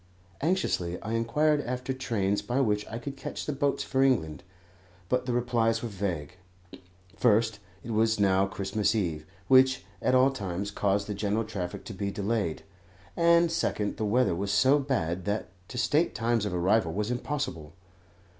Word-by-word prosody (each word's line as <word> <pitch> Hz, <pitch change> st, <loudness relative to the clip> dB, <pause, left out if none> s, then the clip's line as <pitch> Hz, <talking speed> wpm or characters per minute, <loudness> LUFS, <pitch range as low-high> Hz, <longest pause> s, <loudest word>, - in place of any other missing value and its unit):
Anxiously 135 Hz, -, 0 dB
I 110 Hz, -, -4 dB
inquired 145 Hz, +6 st, +2 dB
after 125 Hz, +2 st, -3 dB
trains 105 Hz, -6 st, -1 dB
by 120 Hz, +6 st, -1 dB
which 105 Hz, -5 st, +1 dB
I 115 Hz, -, -5 dB
could 135 Hz, +4 st, -6 dB
catch 135 Hz, -, -6 dB
the 150 Hz, -, -2 dB
boats 140 Hz, 0 st, 0 dB
for 135 Hz, -1 st, 0 dB
England, 100 Hz, -, +1 dB, 0.7 s
but 125 Hz, 0 st, 0 dB
the -, -, 0 dB
replies 115 Hz, -1 st, +1 dB
were 120 Hz, -, -3 dB
vague. 95 Hz, -4 st, -4 dB, 0.8 s
First, 110 Hz, -2 st, +2 dB, 0.2 s
it 115 Hz, -, -6 dB
was 110 Hz, 0 st, +2 dB
now 95 Hz, -1 st, +3 dB
Christmas 100 Hz, +2 st, -1 dB
Eve, 80 Hz, -7 st, -2 dB, 0.2 s
which 130 Hz, 0 st, +5 dB, 0.2 s
at 130 Hz, -, +2 dB
all 130 Hz, +2 st, +5 dB
times 100 Hz, -4 st, -4 dB
caused 100 Hz, 0 st, 0 dB
the 105 Hz, -, -4 dB
general 105 Hz, +2 st, -1 dB
traffic 95 Hz, -5 st, -5 dB
to 110 Hz, -, -7 dB
be 100 Hz, +1 st, -3 dB
delayed; 100 Hz, -3 st, -2 dB, 0.5 s
and, 170 Hz, 0 st, +4 dB
second, 105 Hz, -10 st, -1 dB
the -, -, -2 dB
weather 105 Hz, -2 st, +2 dB
was 100 Hz, +4 st, -2 dB
so 130 Hz, +8 st, +4 dB
bad 95 Hz, -, -1 dB
that 105 Hz, +1 st, -2 dB, 0.2 s
to 125 Hz, -, -8 dB
state 150 Hz, +7 st, +1 dB
times 115 Hz, -1 st, +1 dB
of 95 Hz, -, -4 dB
arrival 90 Hz, 0 st, +2 dB
was 105 Hz, +4 st, -1 dB
impossible. 120 Hz, -, -4 dB
110 Hz, 165 wpm, -28 LUFS, 100-130 Hz, 0.8 s, which